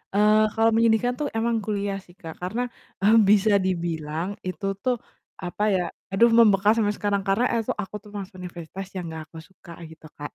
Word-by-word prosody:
eee, 215 +1 +5
kalau 225 0 +4
menyedihkan 230 +2 +3
tuh 295 - -1
emang 230 0 +1
kuliah 200 -1 -2
sih 180 -2 -19
Kak, 165 -5 -10
karena, 205 +8 -2 0.4
eee, 215 +3 +6
bisa 210 +1 +5
dibilang, 170 -1 -3
itu 185 0 -5 0.7
apa 180 +3 -4
ya, 180 - +1 0.3
aduh 230 +5 +4
membekas 210 -3 +5
sampai 205 -1 +1
sekarang 200 -1 0
karena 200 +5 +2 0.2
es 220 - -12 0.2
aku 195 - -10
tuh 210 - -14
masuk 190 -2 -7
universitas 180 +1 -7
yang 180 -2 -4
gak 160 -1 -7
aku 165 - -12
suka 175 -1 -16 0.2
gitu 160 0 -14
Kak. 145 0 -6
195 Hz, 180 wpm, -24 LUFS, 180-215 Hz, 0.7 s, eee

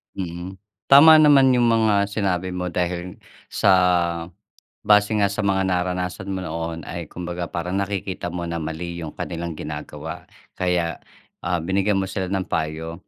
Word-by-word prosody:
Mhm. 90 0 -6 0.3
Tama 155 +3 +9
naman 145 -3 +6
yung 120 - +3
mga 110 -3 +3
sinabi 95 -3 -2
mo 90 0 -3
dahil 90 +1 -3 0.3
sa - - +2 1.2
base 105 0 +4
nga 100 - +3
sa 100 +2 -2
mga 95 -2 +1
naranasan 90 +1 -2
mo 95 -1 -3
noon 80 0 -5
ay 85 -2 -6
kumbaga 90 0 -5
parang 90 +3 -2
nakikita 95 -2 -3
mo 85 0 -4
na 85 -1 -4
mali 85 +2 -5
yung 80 - -5
kanilang 85 -1 -5
ginagawa. 75 -1 -7 0.2
Kaya, 90 -2 -1 0.4
ah, 90 0 -1
binigyan 95 +4 0
mo 95 - 0
sila 95 -1 -4
ng 95 -1 -1
payo. 80 +3 -4
90 Hz, 150 wpm, -22 LUFS, 85-100 Hz, 1.2 s, Tama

